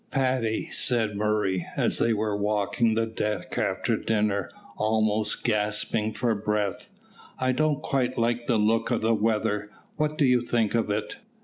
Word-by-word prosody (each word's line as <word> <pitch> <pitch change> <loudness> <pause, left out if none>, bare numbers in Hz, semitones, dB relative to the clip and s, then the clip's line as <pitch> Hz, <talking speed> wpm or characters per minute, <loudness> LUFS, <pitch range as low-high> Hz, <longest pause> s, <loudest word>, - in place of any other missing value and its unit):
"Paddy," 130 -4 0
said 110 -4 +2
Murray, 105 -3 0
as - - +1
they 115 - +2
were 105 -1 0
walking 105 +2 +1
the 115 0 +1
deck 105 -4 -3
after - - 0
dinner, 105 -4 0 0.3
almost 110 0 0
gasping 105 0 0
for 120 +1 0
breath, 105 -2 -2 0.5
"I 130 0 +2
don't 150 +2 0
quite 130 -2 0
like 120 0 0
the 120 -4 +3
look 110 +2 +2
of 120 - 0
the 115 +1 +2
weather; 105 -1 0 0.3
what 150 0 -1
do 150 - +3
you 125 -2 +4
think 120 -3 0
of 115 -2 +1
it?" 105 +1 -2
110 Hz, 155 wpm, -26 LUFS, 105-120 Hz, 0.5 s, you